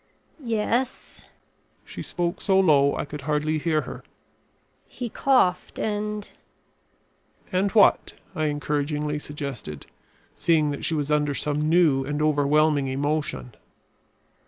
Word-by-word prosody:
"Yes." 235 +2 -2 0.6
She - - -8
spoke 175 -1 -3
so 190 -2 +3
low 145 -6 +4
I - - -3
could 150 0 -8
hardly 150 +2 0
hear 155 -1 +1
her. - - -9 0.8
"He 245 -2 -6
coughed 205 -9 +1
and 210 -1 -3 0.6
" - - -36
"And 190 +2 +1
what?" 215 -3 +4 0.2
I 155 - 0
encouragingly 150 0 -2
suggested, 140 - -7 0.5
seeing 155 -3 +2
that 140 - -4
she 165 - 0
was 145 -1 -2
under 150 -1 +1
some 150 +1 -1
new 160 -6 +4
and 145 +2 -3
overwhelming 150 -1 +2
emotion. 140 - -2
150 Hz, 120 wpm, -25 LUFS, 145-180 Hz, 0.8 s, low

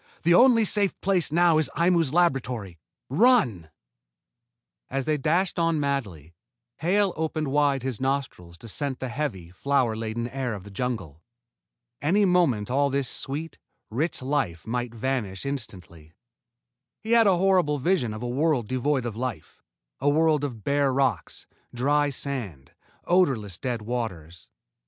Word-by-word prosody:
The 170 +1 +4
only 235 +2 +6
safe 200 -1 +1
place 185 -6 +1
now 170 -1 +4
is 155 -4 +1
Aimu's 170 -4 +2
laboratory. 125 - 0 0.3
Run!" 140 - +3 1.2
As 135 0 -2
they 155 - +1
dashed 170 +6 0
on 165 -2 +1
madly, 105 - -3 0.4
Hale 195 +3 +1
opened 155 -2 -2
wide 140 -2 +2
his 130 -4 -4
nostrils 130 -11 -3
to 115 - -12
scent 135 +4 -3
the 130 - -5
heavy, 115 - -4
flower 125 +2 0
laden 115 +1 -3
air 125 -2 -3
of 100 - -9
the 100 - -12
jungle. 95 - -4 0.8
Any 195 +8 +3
moment 145 - +2
all 140 +2 +2
this 140 -1 0
sweet, 150 +6 -4 0.3
rich 140 +4 -2
life 130 - -1
might 120 +1 -3
vanish 115 -5 -3
instantly. 90 - -6 0.9
He 220 - -6
had 230 -2 +6
a 190 -3 +4
horrible 180 -5 +2
vision 140 - +1
of 110 +2 -6
a - - -2
world 135 -2 0
devoid 130 +1 0
of 115 -3 -4
life, 120 -9 -6 0.4
a 145 - +2
world 155 0 +2
of 120 -7 -5
bare 140 -1 +2
rocks, 130 -6 -1 0.3
dry 145 +4 +2
sand, 120 - -5 0.3
odorless, 130 - +1
dead 120 -4 -3
waters. 90 -9 -5
135 Hz, 145 wpm, -25 LUFS, 115-155 Hz, 1.2 s, only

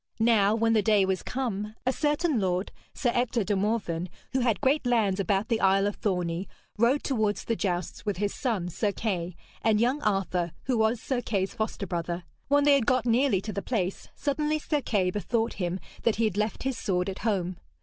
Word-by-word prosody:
Now 220 -2 +4
when 225 0 +2
the 220 - +4
day 205 -1 +4
was 190 -2 0
come, 215 -5 -3
a 255 - +2
certain 295 -1 +1
lord, 185 0 0 0.2
Sir 245 - 0
Ector 245 -2 +1
de 205 +1 0
Morven, 190 -4 -1 0.2
who 265 - +1
had 240 -4 +1
great 285 +2 +2
lands 220 -6 +2
about 195 +2 +1
the 230 -2 0
isle 195 +1 +4
of 205 - -1
Thorney, 180 -2 -1 0.3
rode 235 +6 +2
towards 220 -6 0
the 230 - -1
jousts 180 -4 -2
with 205 -4 -2
his 205 +1 -1
son, 210 -9 -1
Sir 205 +4 0
Kay, 180 -5 -2 0.3
and 215 -1 +3
young 255 +6 +2
Arthur, 185 -4 0
who 255 -3 0
was 220 +1 +2
Sir 250 +1 -2
Kay's 195 -5 -1
foster 220 -2 -3
brother. 175 0 -3 0.2
When 285 +1 +4
they 290 0 +6
had 270 -5 +2
got 255 -2 +3
nearly 240 -4 +3
to 215 +1 -5
the 200 - -2
place, 195 -6 -2
suddenly 300 +1 0
Sir 300 -1 -1
Kay 195 -8 +1
bethought 225 +3 -1
him 175 +1 -1 0.2
that 230 - +2
he 230 - 0
had 215 -4 +1
left 210 0 -1
his 265 -3 -2
sword 180 -1 0
at 195 - -4
home. 185 -5 -1
215 Hz, 205 wpm, -28 LUFS, 190-245 Hz, 0.3 s, they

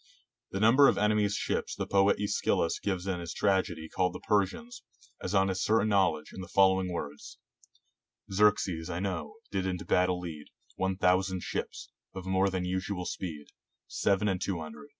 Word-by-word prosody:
The 95 - -4
number 125 +7 +6
of - - +4
the - - 0
enemy's 105 -1 +2
ships - - -2
the - - -3
poet 100 0 +3
iEschylus 100 -4 0
gives 95 -3 -2
in 95 -2 -2
his 85 -1 -6
tragedy 95 -5 0
called 90 +2 0
the - - -7
Persians, 110 - -1 0.4
as 95 +2 -3
on 95 0 +4
his 95 -1 -2
certain 110 0 +2
knowledge, 95 -7 +1
in 95 - -7
the 90 - -7
following 95 0 +3
words 75 -4 -6 0.4
— - - -27
"Xerxes, 95 -5 +2
I 85 - -3
know, 100 - -3 0.2
did 95 -1 -1
into 90 -1 -3
battle 90 0 +2
lead 80 -4 -7 0.3
One 95 0 -1
thousand 95 0 +2
ships; - - -5 0.2
of 95 -1 -6
more 95 +1 +2
than 90 -1 -2
usual 95 0 -3
speed 80 -7 -6 0.4
Seven 100 +1 +1
and 95 -2 -1
two 95 -4 -2
hundred. 75 -2 -9
95 Hz, 180 wpm, -30 LUFS, 90-100 Hz, 0.4 s, number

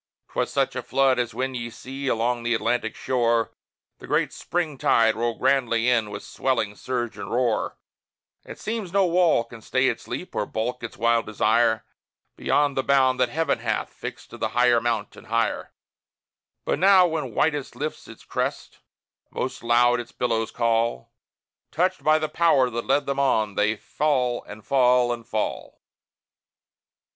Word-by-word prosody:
'Twas - - -1
such - - 0
a - - -2
flood 135 -2 +2
as 120 -2 -2
when 130 +2 -2
ye 120 -2 -4
see 135 +4 -7
along 120 0 0
the 120 0 0
Atlantic 110 -1 -1
shore, 115 -2 +1 0.5
The - - -11
great - - +1
Spring 160 -6 -3
tide 115 -1 +4
roll 115 +1 -1
grandly 125 -3 +2
in 115 -4 +2
with 100 0 -7
swelling 115 -6 -1
surge 120 0 -4
and - - -6
roar: 120 -3 0 0.7
It - - -10
seems 215 -5 -4
no 195 0 +3
wall 175 -7 +3
can 115 -1 -13
stay 130 +3 +1
its 120 - -5
leap 180 - -6
or 105 - -1
balk 125 +3 -3
its 115 - -7
wild 115 +1 +2
desire 110 +1 +2 0.5
Beyond 145 -1 +1
the 135 - +1
bound 130 -2 +3
that 125 -1 +3
Heaven 160 +6 0
hath - - -2
fixed - - -8
to - - -10
higher 120 -1 +3
mount, 115 -3 -2
and - - -14
higher; 115 +1 -1 0.9
But - - 0
now, 190 -1 +6
when 155 -9 -3
whitest 150 -3 0
lifts 155 +2 -5
its - - -13
crest, - - -3 0.5
most 130 - -4
loud 120 +1 +3
its 120 0 -7
billows 115 -2 -1
call, 115 - 0 0.6
Touched 185 +4 0
by 155 0 +5
the 155 0 -1
Power 145 -7 +3
that 120 0 -4
led 140 +2 +2
them 140 0 -2
on, 110 -6 +2
they 105 +2 +1
fall, 125 0 -1
and 105 0 -11
fall, 125 -2 +3
and 115 -1 -9
fall. 110 -2 -3
125 Hz, 165 wpm, -24 LUFS, 115-140 Hz, 0.9 s, now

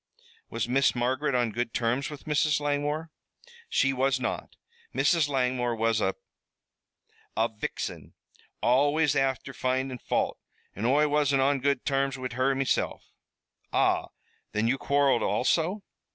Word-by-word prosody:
"Was - - -2
Miss 135 +2 +2
Margaret 130 +3 0
on 120 -2 +1
good 120 +2 -3
terms 120 +4 0
with 150 -2 -9
Mrs. 150 0 +2
Langmore?" 145 +2 -1 0.6
"She 135 0 +2
was 130 0 +1
not. 125 - -4 0.4
Mrs. 165 -4 +3
Langmore 125 -3 0
was 115 -1 +1
a 95 - 0 1.2
a 110 +1 +3
vixin, 110 -2 -6 0.5
always 145 +4 +3
afther 135 0 0
findin' 130 0 -1
fault, - - -1 0.4
an' 105 - -3
Oi 145 +5 +4
wasn't 145 -2 +2
on 140 0 +2
good 140 0 0
terms 135 -1 0
wid 130 -2 -5
her 130 +2 +1
meself." 135 0 -1 0.6
"Ah! - - +2 0.5
Then 105 +2 +1
you 135 +3 +1
quarreled 140 -3 +2
also?" 175 +9 +1
135 Hz, 135 wpm, -27 LUFS, 125-145 Hz, 1.2 s, Oi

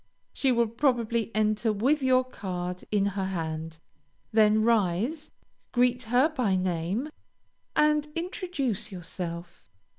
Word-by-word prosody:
She 270 - +2
will 235 -1 +3
probably 235 -2 0
enter 215 +1 +2
with 260 +9 +1
your 255 -1 +4
card 180 -7 -5
in 205 -2 +2
her 200 -1 -1
hand; 160 -3 -4 0.5
then 215 0 +4
rise, 230 - +1 0.4
greet 245 0 +3
her 245 +6 +4
by 250 - 0
name, 185 - -1 0.7
and 300 0 +3
introduce 310 - -2
yourself. 175 -1 -7
220 Hz, 115 wpm, -27 LUFS, 185-255 Hz, 0.7 s, your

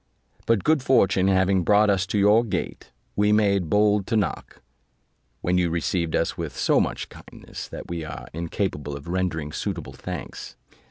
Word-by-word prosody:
But 115 -4 +2
good 155 -2 +3
fortune 100 -8 +3
having 95 0 +3
brought 105 +3 +4
us 95 -1 0
to 100 - -1
your 105 +3 +5
gate, 115 - -4 0.2
we 105 +1 +3
made 100 -5 +2
bold 105 0 +3
to 115 - +1
knock, 100 - -3 0.8
when 90 +1 +1
you 90 -1 +1
received 85 0 -1
us - - 0
with - - -5
so - - +3
much - - -2
kindness, - - -10
that - - -8
we 85 -2 -4
are 80 - -7
incapable 80 -3 -3
of 70 - -12
rendering 85 -4 -2
suitable 85 -1 -4
thanks. - - -7
95 Hz, 165 wpm, -24 LUFS, 85-105 Hz, 0.8 s, your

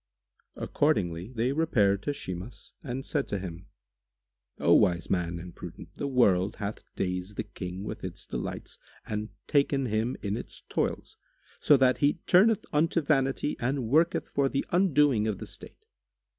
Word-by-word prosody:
Accordingly, 95 - 0
they 120 +1 0
repaired 110 -11 +2
to 145 - -1
Shimas 95 -4 -7
and 135 -3 -5
said 145 -3 -1
to 100 - -2
him, 90 -1 -7 0.9
"O - - +4
wise 85 -2 +3
man 85 -2 0
and 85 0 -9
prudent, - - -9
the 140 - -3
world 100 -8 +3
hath 100 +1 -4
dazed 90 +2 -3
the - - -1
King 90 +1 -7
with - - -6
its - - -6
delights - - -5 0.3
and 105 0 -3 0.2
taken 140 -1 +2
him 110 +2 -1
in 100 +1 -1
its - - -8
toils, - - -2 0.4
so 145 - +6
that 130 -1 +3
he 145 0 +4
turneth 205 +4 +5
unto 165 +3 +3
vanity 140 -2 +1
and 130 -1 -1
worketh 165 +6 +3
for 140 -1 +1
the 135 - -1
undoing 150 - +3
of 105 -3 -1
the - - -7
state. - - -11
120 Hz, 155 wpm, -28 LUFS, 95-145 Hz, 0.9 s, so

